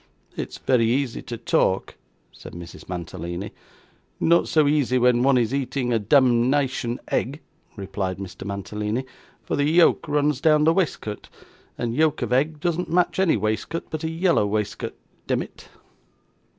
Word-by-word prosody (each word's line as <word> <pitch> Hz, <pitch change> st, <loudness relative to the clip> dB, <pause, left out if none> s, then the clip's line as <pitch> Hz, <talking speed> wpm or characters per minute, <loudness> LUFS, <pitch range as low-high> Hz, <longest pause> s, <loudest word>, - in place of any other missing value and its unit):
'It's -, -, -5 dB
very 115 Hz, -3 st, +2 dB
easy 130 Hz, -2 st, -1 dB
to 120 Hz, -, -6 dB
talk,' 160 Hz, -, +1 dB, 0.4 s
said -, -, -12 dB
Mrs. 85 Hz, 0 st, -10 dB
Mantalini. 85 Hz, +1 st, -5 dB, 0.7 s
'Not 170 Hz, +1 st, +3 dB
so 155 Hz, -2 st, +3 dB
easy 145 Hz, -4 st, +2 dB
when 125 Hz, -1 st, +4 dB
one 135 Hz, 0 st, +4 dB
is 120 Hz, 0 st, +1 dB
eating 130 Hz, -2 st, -1 dB
a 115 Hz, -, +2 dB
demnition 125 Hz, +1 st, +2 dB
egg,' 140 Hz, +5 st, -1 dB, 0.4 s
replied 95 Hz, -2 st, -4 dB
Mr. 95 Hz, -1 st, -8 dB
Mantalini; 105 Hz, +4 st, -3 dB, 0.4 s
'for -, -, -2 dB
the 145 Hz, -, +1 dB
yolk 170 Hz, 0 st, +4 dB
runs 145 Hz, -2 st, +1 dB
down 155 Hz, -1 st, +4 dB
the 160 Hz, +1 st, +5 dB
waistcoat, 155 Hz, -, -2 dB, 0.5 s
and 120 Hz, -1 st, -2 dB
yolk 155 Hz, +2 st, +1 dB
of -, -, -1 dB
egg 150 Hz, +4 st, +1 dB
does 175 Hz, 0 st, -1 dB
not 180 Hz, -, -3 dB
match 175 Hz, +2 st, +1 dB
any 185 Hz, -9 st, +3 dB
waistcoat 110 Hz, -, -2 dB
but 155 Hz, 0 st, -4 dB
a 160 Hz, -, -1 dB
yellow 165 Hz, -, +2 dB
waistcoat, 105 Hz, 0 st, -3 dB, 0.3 s
demmit. -, -, -3 dB
130 Hz, 150 wpm, -24 LUFS, 105-155 Hz, 0.7 s, the